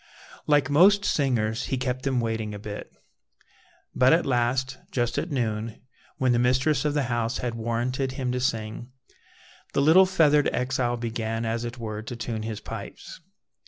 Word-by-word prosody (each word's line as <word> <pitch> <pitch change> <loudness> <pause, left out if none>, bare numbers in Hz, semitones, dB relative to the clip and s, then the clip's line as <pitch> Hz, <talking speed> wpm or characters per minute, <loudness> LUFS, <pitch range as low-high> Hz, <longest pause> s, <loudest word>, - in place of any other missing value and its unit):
Like 145 -3 +4
most 195 +8 +5
singers, 115 -6 0
he 130 - -2
kept 130 0 -2
them 130 -1 0
waiting 110 -2 -2
a - - -5
bit. 105 0 -7 1.0
But 130 +3 +5
at 170 - +3
last, 130 +1 0
just 120 -2 -1
at 175 - -4
noon, 115 -5 -2 0.4
when 130 -1 +2
the 120 - +3
mistress 130 +4 +2
of 150 -1 0
the 145 - +2
house 120 0 -1
had 120 -2 -3
warranted 120 +3 -2
him 130 -2 -2
to 125 - -1
sing, 115 -1 -2 0.8
the - - +2
little 180 +6 +7
feathered 150 -5 +4
exile 125 -1 -1
began, 115 -1 -3
as 115 +1 -2
it 120 +1 -6
were, 110 -2 -5
to 115 +2 -7
tune 115 -1 -4
his 110 -1 -4
pipes. - - -9
125 Hz, 165 wpm, -26 LUFS, 115-135 Hz, 1.0 s, little